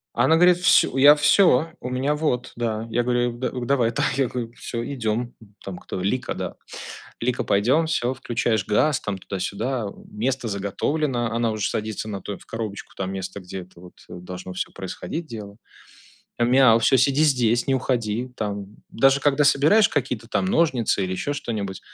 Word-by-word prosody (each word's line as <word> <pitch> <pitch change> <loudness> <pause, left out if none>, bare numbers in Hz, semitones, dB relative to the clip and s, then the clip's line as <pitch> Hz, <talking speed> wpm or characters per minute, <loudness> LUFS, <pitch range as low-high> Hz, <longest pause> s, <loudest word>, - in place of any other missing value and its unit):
Она 160 - +4
говорит, 180 +1 +5
всю 180 -6 +4
я 145 +2 +8
всё 155 0 +4
у 125 - -5
меня 135 +4 0
вот. 130 -5 -1
Да. 115 -2 -2
Я 120 +2 0
говорю, 120 0 +1
а - - -4
г 120 - -11
да, 125 -2 -4
давай, 120 -3 +2
да - - -1
я 135 -3 +2
говорю, 115 -1 -5
всё, 115 -1 -4
идем. 120 -2 -2
М. 105 -2 -19
Там 95 -2 -6
кто, 95 - -6
Лика, 125 +7 -1
да, - - -5 0.7
Лика, 125 +1 0
пойдем, 120 +11 +2
всё, 130 -5 0
включаешь 115 -5 -1
газ, 140 +7 +2
там 100 -2 -3
туда-сюда, 105 +6 -3
э, - - -10 0.2
место 125 +3 -2
заготовлено. 120 +5 -1
Она 115 0 0
уже 105 -2 -1
садится 110 0 -4
на 100 -2 -5
то 100 - -6
в - - -18
коробочку, 110 -3 -6
там 95 0 -3
место, 95 +1 -5
где 95 0 -7
это 90 -1 -16
вот, 90 0 -14 0.2
э, - - -9
должно 90 +1 -8
всё 90 - -4
происходить 155 - -6
дело. 105 -4 -9 0.8
Мяу. 120 -1 +5
Всё, 125 - +4
сиди 135 +3 +3
здесь, 120 -5 +2
не 135 - +3
уходи. 120 -2 -1
Там. 100 -1 -5
Даже 135 +3 +3
когда 145 +1 +2
собираешь 150 +10 +5
какие-то 125 -5 -2
там 185 - 0
ножницы 135 - +1
или 95 - -3
еще 95 +10 -2
что-нибудь 105 -9 -4
120 Hz, 185 wpm, -23 LUFS, 105-135 Hz, 0.8 s, я